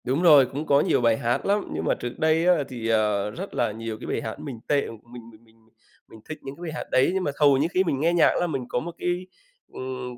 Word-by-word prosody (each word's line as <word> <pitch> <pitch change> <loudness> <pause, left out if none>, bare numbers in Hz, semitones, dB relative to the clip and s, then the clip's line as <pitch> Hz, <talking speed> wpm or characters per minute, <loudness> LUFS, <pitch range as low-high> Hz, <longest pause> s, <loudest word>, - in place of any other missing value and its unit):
Đúng 130 +6 0
rồi, 150 -6 +7
cũng 140 +5 -5
có 140 -1 +4
nhiều - - +1
bài 115 -2 +3
hát 120 -1 -1
lắm, 205 +1 0
nhưng 80 +1 -3
mà - - +2
trước 120 0 -7
đây 160 +1 +2
á 180 0 +5
thì, 120 -3 -5
ờ, 105 -2 +1
rất 190 - -7
là 120 -3 0
nhiều 110 0 -6
cái - - -8
bài - - -2
hát 110 - -6
mình 125 -5 -7
tệ, 145 -1 +2
mình 115 +1 -12
mình 110 +1 -19
mình 110 0 -25 0.5
mình 110 - -14
thích 155 - -5
những 135 +1 -8
cái 170 - -16
bài 170 -2 -5
hát - - -4
đấy, 130 - +3
nhưng 190 -1 -1
mà 145 - -1
hầu 145 -2 +5
như 145 +4 +1
khi 185 - +3
mình 140 -7 -1
nghe 165 +4 +2
nhạc 170 - +5
ấy - - 0
là 175 - +1
mình 135 -6 -3
có - - 0
một 170 +6 -6
cái, 180 +1 -2 0.5
ừm, 130 -1 -6
135 Hz, 285 wpm, -25 LUFS, 115-160 Hz, 0.5 s, rồi